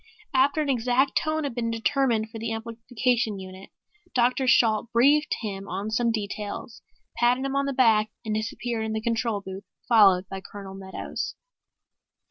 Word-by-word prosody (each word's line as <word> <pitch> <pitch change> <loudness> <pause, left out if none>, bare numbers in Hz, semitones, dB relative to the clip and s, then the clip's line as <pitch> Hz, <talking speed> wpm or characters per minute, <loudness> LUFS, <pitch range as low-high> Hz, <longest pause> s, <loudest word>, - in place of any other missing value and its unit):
After 280 +4 +3
an 290 - -3
exact 255 +2 +2
tone 310 -1 0
had 280 -4 -3
been 230 -1 -2
determined 230 -1 0
for 225 - -7
the 225 +1 -3
amplification 230 0 -1
unit, 190 0 -10 0.5
Dr. 255 +2 +2
Shalt 225 -2 +3
briefed 285 +6 +4
him 200 -3 -5
on 200 +4 -3
some 235 +1 +2
details, 210 +1 -5 0.4
patted 250 +2 +2
him 275 0 -2
on 275 0 +1
the - - 0
back 220 -4 +4 0.2
and 215 - -1
disappeared 225 +1 -2
into 220 0 -3
the 220 - -3
control 230 -2 0
booth 190 +1 -8 0.2
followed 195 -6 +5
by 195 0 -6
Colonel 195 -1 -9
Meadows. 190 0 -5
230 Hz, 160 wpm, -26 LUFS, 210-250 Hz, 0.5 s, followed